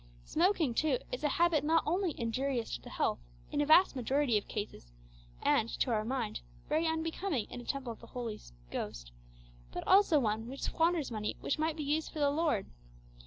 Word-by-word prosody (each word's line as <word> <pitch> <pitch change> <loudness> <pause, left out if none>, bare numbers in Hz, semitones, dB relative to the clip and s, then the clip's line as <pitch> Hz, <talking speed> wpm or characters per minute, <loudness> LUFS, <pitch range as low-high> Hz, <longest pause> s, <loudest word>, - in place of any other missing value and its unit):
Smoking, 335 - +2
too, 285 +1 +2
is 250 - -4
a 295 - +3
habit 330 -1 +3
not 320 +2 +3
only 350 0 0
injurious 240 +1 -1
to - - -8
the - - -10
health - - 0 0.3
in 290 - +1
a 290 - +1
vast 315 0 +6
majority 265 0 +1
of 205 - 0
cases, 205 - -6 0.5
and, 225 - +3
to 255 - +1
our 215 -2 +1
mind, 255 - -2 0.3
very 325 +1 +1
unbecoming 320 - -1
in 245 - -6
a - - -12
"temple 265 -4 -3
of - - -17
the - - -13
Holy 230 -4 -5 0.3
Ghost," - - -5 0.6
but - - -5
also 385 -5 +6
one 220 -2 -1
which 270 +2 -7
squanders 330 -4 +1
money 210 -2 -3
which 280 - -1
might 315 0 0
be 305 - -3
used 300 +2 0
for - - -9
the 285 -1 +3
Lord. 295 -9 +1
280 Hz, 195 wpm, -32 LUFS, 230-320 Hz, 0.6 s, vast